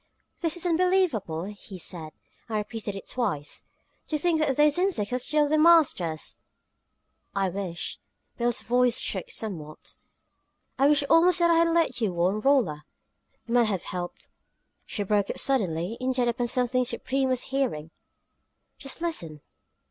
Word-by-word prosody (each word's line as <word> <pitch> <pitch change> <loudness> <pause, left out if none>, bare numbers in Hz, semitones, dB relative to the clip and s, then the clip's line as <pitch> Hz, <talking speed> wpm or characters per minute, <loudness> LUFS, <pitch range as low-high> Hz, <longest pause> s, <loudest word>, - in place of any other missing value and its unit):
"This 330 -1 -1
is 350 - -1
unbelievable!" 335 - +1
he 200 0 -9
said, 160 -3 -5 0.4
and 215 - -1
repeated 210 -1 -4
it 195 - -8
twice. 195 - -2 0.5
"To 310 - -1
think 330 +1 +1
that 290 -4 +1
those 295 +2 +4
insects 335 - 0
are 250 - +1
still 300 +3 +2
the 310 +1 +2
masters!" 295 - +3 1.0
"I 195 -1 +1
wish" 180 -2 -4 0.4
Billie's 240 -1 -1
voice 245 0 +2
shook 190 -3 -3
somewhat 160 -9 -6 0.8
"I 275 - +5
wish 295 -1 +4
almost 340 +3 +5
that 340 -1 +4
I 335 - +4
had 335 - +4
let 330 -7 +1
you 205 -5 +1
warn 180 +4 +1
Rolla. 225 - +2 0.6
It - - -7
might 240 -1 +4
have 195 -5 -2
helped 175 -1 -6 0.3
" - - -47
She 205 - -3
broke 205 0 +1
off - - -3
suddenly, 195 -6 0
intent 255 -1 +1
upon 240 0 -2
something 250 +1 +1
Supreme 265 +2 -1
was 255 -1 0
hearing. 170 - -1 0.9
"Just 275 +4 -5
listen!" 165 - -3
240 Hz, 155 wpm, -27 LUFS, 190-295 Hz, 1.0 s, I